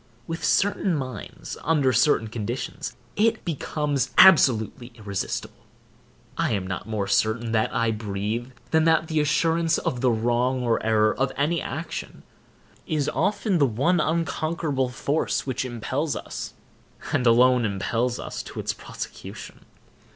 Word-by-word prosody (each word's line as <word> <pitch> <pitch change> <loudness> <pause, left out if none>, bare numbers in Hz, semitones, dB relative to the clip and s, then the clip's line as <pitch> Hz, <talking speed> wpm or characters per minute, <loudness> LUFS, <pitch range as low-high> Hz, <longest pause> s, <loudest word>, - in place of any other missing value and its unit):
With 165 +4 -5
certain 200 -2 +2
minds, 130 -7 -6
under 145 -5 +2
certain 120 -1 +3
conditions, 110 -2 -5 0.2
it 220 +1 +1
becomes 150 -3 -1
absolutely 125 - +5
irresistible. 100 -4 -5 0.8
I - - +1
am 100 -3 -1
not 95 +3 -5
more 105 -3 -1
certain 110 +4 +1
that 110 -1 +1
I 115 -1 +1
breathe, 105 +3 -3 0.2
than 160 0 +3
that 160 0 +3
the 155 -1 +1
assurance 165 +2 +2
of 125 - -2
the 130 - +3
wrong 120 +3 +1
or 115 -2 +1
error 110 -1 +3
of 135 0 0
any 150 +4 +1
action - - -6 0.6
is 150 -3 0
often 195 0 0
the 140 - +5
one 140 +10 +1
unconquerable 155 -3 -1
force 140 +5 -1
which 130 -2 -2
impels 130 +5 -2
us, - - -6 0.6
and 125 - +2
alone 125 +1 +5
impels 115 +4 -1
us - - -5
to - - -8
its - - -2
prosecution. - - -9
130 Hz, 135 wpm, -25 LUFS, 115-160 Hz, 0.8 s, absolutely